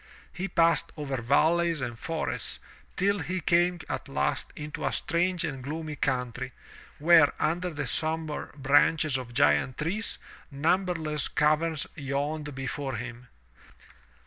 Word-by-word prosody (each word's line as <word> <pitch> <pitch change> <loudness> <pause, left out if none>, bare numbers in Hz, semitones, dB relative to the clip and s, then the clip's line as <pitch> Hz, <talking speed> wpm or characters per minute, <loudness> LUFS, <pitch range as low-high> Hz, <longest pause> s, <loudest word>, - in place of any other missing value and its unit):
He 180 +2 -3
passed 170 -2 +3
over 135 -4 -3
valleys 165 +6 +3
and 120 -2 -4
forests, 165 +2 -3 0.4
till 200 +2 +2
he 185 +1 -2
came 175 +1 +2
at 130 0 -4
last 135 - -1
into 150 0 -6
a - - +1
strange 175 +1 0
and 135 -2 -4
gloomy 155 +2 -4
country, 125 -1 -2 0.4
where, 160 -1 +6
under 175 +3 0
the 150 -3 -4
sombre 155 +3 -2
branches 145 +1 +3
of 125 -2 -4
giant 135 -2 +3
trees, 190 +9 -2 0.3
numberless 155 0 0
caverns 155 +1 +1
yawned 145 0 -3
before 135 0 -3
him. 120 +2 -7
150 Hz, 125 wpm, -28 LUFS, 135-170 Hz, 0.4 s, where